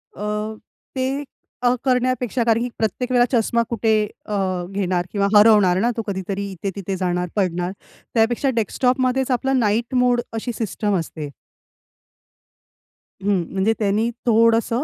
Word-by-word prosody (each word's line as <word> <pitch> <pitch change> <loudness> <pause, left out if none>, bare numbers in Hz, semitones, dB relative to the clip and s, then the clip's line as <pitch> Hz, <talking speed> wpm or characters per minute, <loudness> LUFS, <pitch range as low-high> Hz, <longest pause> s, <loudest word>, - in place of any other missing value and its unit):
अ, 210 +2 -3 0.4
ते 265 +2 -1 0.4
अ, 245 0 +4
करण्यापेक्षा 250 -2 +1
कारण 230 0 +2
की 245 - -2
प्रत्येक 235 +4 -2
वेळा 245 -1 +5
चष्मा 235 -1 +2
कुठे 225 -2 +1 0.3
अ, 210 - -3 0.4
घेणार 185 -3 -1
किंवा 200 -1 +1
हरवणार 205 -4 +6
ना 240 +3 +2
तो - - 0
कधीतरी 195 +1 -3
इथे 190 +1 -4
तिथे 195 -1 -4
जाणार, 180 -1 -1
पडणार. 180 -3 0 0.4
त्यापेक्षा 235 +4 +2
डेस्कटॉपमध्येच 255 +3 +1
आपलं 265 +1 +1
नाईट 230 +3 0
मोड 245 -1 +3
अशी 225 +2 -3
सिस्टम 210 -2 -1
असते. 155 -2 -6 1.9
हं, 195 -2 +1
म्हणजे 195 +3 +2
त्यांनी 215 +2 +1 0.2
थोडसं 230 +2 +3
220 Hz, 135 wpm, -21 LUFS, 200-245 Hz, 1.9 s, हरवणार